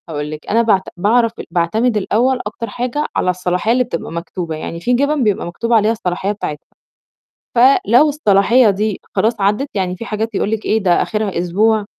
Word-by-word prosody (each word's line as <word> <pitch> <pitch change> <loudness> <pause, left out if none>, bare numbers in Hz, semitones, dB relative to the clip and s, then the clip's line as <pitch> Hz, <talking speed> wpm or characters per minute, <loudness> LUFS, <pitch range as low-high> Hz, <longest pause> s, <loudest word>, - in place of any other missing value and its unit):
هاقول 150 -1 -4
لِك 155 0 -9
أنا 230 +2 +3
باعت 210 -5 +3 0.2
باعرف 225 +5 +2 0.2
باعتمد 215 +7 +1
الأول 245 +6 +1
أكتر 220 +2 -6
حاجة 250 +7 -2
على - - +1
الصلاحية 180 +3 0
اللي 250 +1 +3
بتبقى 245 - -5
مكتوبة، 170 0 -5
يعني 165 +2 -6
في 245 +9 0
جِبن 285 +2 +1
بيبقى 210 -4 0
مكتوب 230 +7 -3
عليها 220 -1 +4
الصلاحية 195 -3 -2
بتاعتها، 150 -8 -6 0.9
فلو 250 +2 +5
الصلاحية 230 -3 +3
دي 205 0 -1 0.2
خلاص 220 -1 +1
عدّت، 210 +8 +1
يعني 185 -2 -2
في 230 - -8
حاجات 220 0 -3
يقول 205 - -1
لِك 220 -1 -2
إيه، 220 -1 +1
ده 175 -2 +3
آخرها 210 -4 -2
أسبوع، 210 +5 +1
215 Hz, 180 wpm, -17 LUFS, 180-235 Hz, 0.9 s, فلو